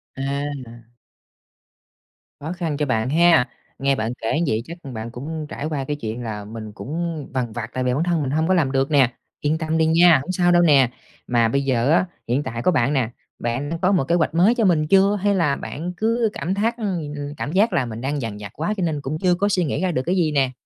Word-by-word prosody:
À, 135 Hz, -, -6 dB, 0.4 s
là 115 Hz, +1 st, -12 dB, 1.6 s
Khó 155 Hz, +4 st, -5 dB
khăn 165 Hz, -5 st, -3 dB
cho 150 Hz, -, 0 dB
bạn 115 Hz, -2 st, 0 dB
ha, 165 Hz, -3 st, +5 dB, 0.3 s
nghe 135 Hz, 0 st, +2 dB
bạn 110 Hz, +1 st, -2 dB
kể 115 Hz, +8 st, 0 dB
như -, -, +1 dB
vậy 110 Hz, +1 st, 0 dB
chắc 170 Hz, +2 st, -8 dB
là 135 Hz, -3 st, -8 dB
bạn 110 Hz, +1 st, -6 dB
cũng 155 Hz, +5 st, -5 dB
trải 145 Hz, -, -5 dB
qua 145 Hz, -4 st, -2 dB
cái 145 Hz, +2 st, -3 dB
chuyện 115 Hz, -2 st, -5 dB
là 105 Hz, -2 st, -5 dB
mình 110 Hz, 0 st, -8 dB
cũng 160 Hz, +5 st, -4 dB
vằn 125 Hz, -3 st, -1 dB
vặt 115 Hz, -1 st, -5 dB
tại 130 Hz, -, -1 dB
vì 125 Hz, 0 st, +1 dB
bản 150 Hz, +5 st, +1 dB
thân 170 Hz, -3 st, +1 dB
mình 135 Hz, -1 st, -2 dB
hông 160 Hz, +2 st, +1 dB
có 185 Hz, -, +3 dB
làm 150 Hz, -7 st, +2 dB
được 135 Hz, +2 st, 0 dB
nè, 135 Hz, -4 st, +4 dB, 0.3 s
yên 150 Hz, +2 st, +1 dB
tâm 160 Hz, 0 st, -1 dB
đi 160 Hz, -, +3 dB
nha, 165 Hz, -1 st, +6 dB
hổng 185 Hz, -, -4 dB
sao 175 Hz, -1 st, +2 dB
đâu 175 Hz, 0 st, +5 dB
nè. 140 Hz, -7 st, +5 dB, 0.4 s
Mà 120 Hz, -2 st, +3 dB
bây 140 Hz, +5 st, +1 dB
giờ 130 Hz, 0 st, +1 dB
á 175 Hz, +3 st, +4 dB, 0.2 s
hiện 130 Hz, +5 st, +1 dB
tại 115 Hz, +1 st, -4 dB
có 185 Hz, -, +3 dB
bạn 140 Hz, -2 st, +2 dB
nè, 125 Hz, -5 st, +1 dB, 0.3 s
bạn 120 Hz, +5 st, -2 dB
đã 165 Hz, -, -2 dB
có 185 Hz, -, +3 dB
một 185 Hz, -7 st, +3 dB
kế 170 Hz, -, +3 dB
hoạch 165 Hz, -2 st, +1 dB
mới 195 Hz, +8 st, +4 dB
cho 225 Hz, -4 st, +2 dB
mình 155 Hz, -4 st, +3 dB
chưa, 195 Hz, +3 st, +4 dB
hay 205 Hz, 0 st, +2 dB
là 150 Hz, -7 st, +2 dB
bạn 175 Hz, +4 st, -5 dB
cứ 230 Hz, +1 st, +1 dB
cảm 180 Hz, -, -2 dB
thác 225 Hz, +4 st, 0 dB
ừm, 175 Hz, -9 st, -3 dB, 0.2 s
cảm 145 Hz, -, -3 dB
giác 200 Hz, +2 st, +3 dB
là 140 Hz, -7 st, +1 dB
mình 115 Hz, 0 st, -6 dB
đang 140 Hz, +1 st, -2 dB
dằn 110 Hz, -3 st, -4 dB
vặt 100 Hz, -, -8 dB
quá 165 Hz, +8 st, -1 dB
cho 185 Hz, -, -1 dB
nên 155 Hz, -4 st, -1 dB
cũng 140 Hz, +3 st, -3 dB
chưa 180 Hz, 0 st, +3 dB
có 200 Hz, +3 st, +1 dB
suy 185 Hz, -3 st, +2 dB
nghĩ 155 Hz, +2 st, -2 dB
ra 185 Hz, -, +1 dB
được 130 Hz, -6 st, 0 dB
cái 180 Hz, +2 st, +1 dB
gì 165 Hz, -4 st, +2 dB
nè? 135 Hz, -3 st, +2 dB
150 Hz, 260 wpm, -22 LUFS, 130-175 Hz, 1.6 s, nha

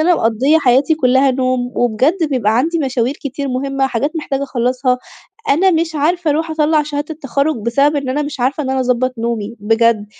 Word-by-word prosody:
أنا 355 Hz, -, +5 dB
مقضية 255 Hz, +8 st, +2 dB
حياتي 270 Hz, +3 st, +3 dB
كلّها 265 Hz, -1 st, +3 dB
نوم، 255 Hz, -1 st, -1 dB
وبجد 280 Hz, -, +1 dB
بيبقى 225 Hz, -4 st, +1 dB
عندي 325 Hz, +6 st, +1 dB
مشاوير 260 Hz, -2 st, -1 dB
كتير 280 Hz, -1 st, -5 dB
مهمّة، 270 Hz, +1 st, -1 dB
حاجات 275 Hz, +6 st, -2 dB
محتاجة 280 Hz, -3 st, -3 dB
أخلصها. 250 Hz, 0 st, 0 dB, 0.5 s
أنا 365 Hz, +7 st, +4 dB
مش 325 Hz, -1 st, 0 dB
عارفة 325 Hz, +2 st, 0 dB
أرُوح 320 Hz, +2 st, -1 dB
أطلّع 310 Hz, -1 st, +2 dB
شهادة 295 Hz, +1 st, -4 dB
التخرج 280 Hz, 0 st, -1 dB
بسبب 280 Hz, +6 st, +2 dB
إن 275 Hz, -2 st, -3 dB
أنا 290 Hz, +3 st, 0 dB
مش 290 Hz, -3 st, -6 dB
عارفة 275 Hz, +4 st, 0 dB
إن 265 Hz, -, -3 dB
أنا 265 Hz, 0 st, 0 dB
أضبط 255 Hz, 0 st, 0 dB
نومي، 230 Hz, -1 st, -3 dB
بجد، 225 Hz, 0 st, +2 dB
270 Hz, 180 wpm, -16 LUFS, 245-300 Hz, 0.5 s, أنا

